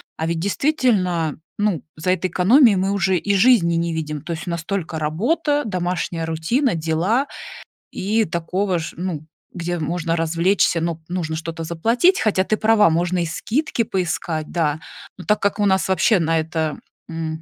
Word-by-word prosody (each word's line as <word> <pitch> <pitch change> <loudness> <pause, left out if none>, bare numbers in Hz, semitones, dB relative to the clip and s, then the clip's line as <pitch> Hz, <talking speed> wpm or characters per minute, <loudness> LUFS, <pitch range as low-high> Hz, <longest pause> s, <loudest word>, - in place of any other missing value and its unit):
А 160 - -3
ведь 165 0 -1
действительно, 190 - +1 0.2
ну, 205 -9 0
за 180 +4 0
этой 185 0 0
экономией 220 +4 +5
мы 190 +1 0
уже 190 -2 +1
и 200 +4 0
жизни 195 -5 +4
не 170 0 -1
видим, 150 -2 -4
то 170 - -7
есть 160 +1 -7
у - - -2
нас 170 -1 -3
только 165 -4 -3
работа, 290 - 0
домашняя 175 -4 -2
рутина, 170 - 0
дела, 170 - 0 0.6
и 215 +4 0
такого 180 +2 -1
ж 165 - -6
ну, 170 -4 -4 0.3
где 175 0 -3
можно 165 +1 -1
развлечься, 170 +2 +2
но 165 0 -3
нужно 175 -3 -3
что-то 165 +1 -5
заплатить 230 - +2
Хотя 200 -3 +2
ты 215 - 0
права, 215 -2 +4
можно 175 +2 0
и 170 - 0
скидки 235 - -1
поискать, 170 -5 -3
да. 155 -3 0 0.4
Но 180 - -10
так 210 - +1
как 200 +1 0
у 205 - +2
нас 190 -1 +2
вообще 190 +2 +3
на 165 0 +1
это, 160 -1 -2 0.3
м, 160 -1 -4
175 Hz, 170 wpm, -21 LUFS, 165-205 Hz, 0.6 s, экономией